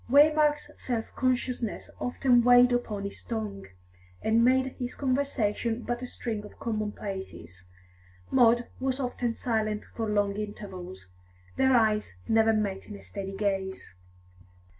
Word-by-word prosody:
Waymark's 295 +2 +4
self 235 -3 -3
consciousness 250 -3 -1
often 245 0 +3
weighed 245 0 +7
upon 215 -4 -1
his 200 - -6
tongue, 210 -4 -4 0.6
and 225 +1 +4
made 260 +1 +3
his 250 -1 -4
conversation 245 -4 0
but 240 0 -3
a 255 - -4
string 220 -4 -4
of 205 - -12
commonplaces; 195 - -5 0.6
Maud 240 -1 +5
was 260 0 -1
often 245 -2 -2
silent 215 -3 -1
for 225 -2 -2
long 205 -1 +1
intervals. 190 - -7 0.5
Their 265 -1 +4
eyes 215 - +1
never 225 0 +4
met 205 -3 -1
in 210 - -8
a - - -11
steady 195 -1 -6
gaze. 195 - -2
225 Hz, 130 wpm, -28 LUFS, 205-250 Hz, 0.6 s, weighed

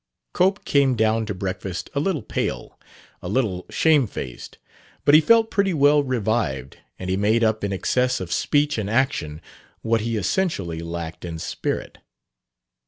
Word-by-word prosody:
Cope 190 +3 +1
came 140 -3 +3
down 110 0 +1
to 105 - -3
breakfast 95 0 -5
a 140 - 0
little 155 - -1
pale, - - -4 0.4
a 90 - -6
little 100 -5 -1
shamefaced; 130 - 0 0.5
but 145 - +5
he 155 - +9
felt 225 +6 +4
pretty 195 -3 +1
well 145 0 +5
revived 110 - -2 0.2
and 95 - -6
he 95 - 0
made 110 +4 +2
up 110 -1 +1
in 100 - -1
excess 125 +6 0
of 90 -2 -4
speech 145 -3 +1
and 100 -1 -3
action 110 - -1 0.4
what 115 0 +1
he 115 0 -2
essentially 100 - -1
lacked 85 0 -6
in 85 -2 -5
spirit. - - -4
110 Hz, 155 wpm, -23 LUFS, 95-145 Hz, 0.5 s, he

